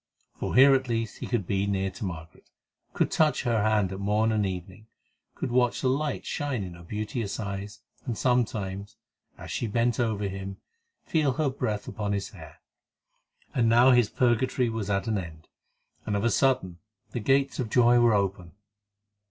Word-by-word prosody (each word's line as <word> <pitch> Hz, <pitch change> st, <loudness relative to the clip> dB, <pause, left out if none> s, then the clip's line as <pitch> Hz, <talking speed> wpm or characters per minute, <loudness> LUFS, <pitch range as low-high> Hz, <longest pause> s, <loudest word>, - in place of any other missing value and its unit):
For -, -, -3 dB
here 135 Hz, +2 st, +8 dB
at 130 Hz, -1 st, +1 dB
least 115 Hz, -2 st, -2 dB
he -, -, -5 dB
could 120 Hz, -6 st, -1 dB
be 100 Hz, +2 st, 0 dB
near 95 Hz, -1 st, -1 dB
to 95 Hz, -, -6 dB
Margaret, 85 Hz, -3 st, -8 dB, 0.4 s
could -, -, 0 dB
touch 155 Hz, -4 st, +2 dB
her 115 Hz, -3 st, +1 dB
hand 105 Hz, -3 st, +2 dB
at 95 Hz, -, -6 dB
morn 105 Hz, +3 st, +1 dB
and 105 Hz, -2 st, +1 dB
evening, 95 Hz, +3 st, -7 dB, 0.5 s
could 125 Hz, -, -4 dB
watch 125 Hz, -1 st, +2 dB
the 130 Hz, -, +2 dB
light 145 Hz, +2 st, -1 dB
shine 140 Hz, -7 st, -2 dB
in 90 Hz, -2 st, -7 dB
her 85 Hz, -, -12 dB
beauteous 105 Hz, +4 st, -4 dB
eyes, 100 Hz, 0 st, -5 dB, 0.2 s
and 120 Hz, -5 st, -3 dB
sometimes, 105 Hz, -6 st, -1 dB, 0.4 s
as -, -, -9 dB
she 120 Hz, -, -2 dB
bent 115 Hz, +2 st, 0 dB
over 110 Hz, -4 st, 0 dB
him, 95 Hz, 0 st, -6 dB, 0.5 s
feel 150 Hz, -5 st, +1 dB
her 150 Hz, -1 st, 0 dB
breath 105 Hz, -6 st, -3 dB
upon 105 Hz, -1 st, -3 dB
his 100 Hz, -1 st, -2 dB
hair. -, -, -13 dB, 0.9 s
And 115 Hz, -3 st, +2 dB
now 120 Hz, +3 st, +6 dB
his 120 Hz, -4 st, +4 dB
purgatory 125 Hz, 0 st, +1 dB
was 110 Hz, -3 st, -4 dB
at 100 Hz, +2 st, 0 dB
an 110 Hz, -3 st, 0 dB
end, 80 Hz, -3 st, -9 dB, 0.6 s
and 105 Hz, -, 0 dB
of 100 Hz, -, -1 dB
a 115 Hz, -, +2 dB
sudden 130 Hz, -11 st, +1 dB, 0.3 s
the 120 Hz, -, -3 dB
gates 135 Hz, +4 st, +1 dB
of 120 Hz, -4 st, -2 dB
joy 120 Hz, +1 st, +5 dB
were 120 Hz, -2 st, +4 dB
open. 95 Hz, -3 st, -2 dB
110 Hz, 180 wpm, -27 LUFS, 100-125 Hz, 0.9 s, here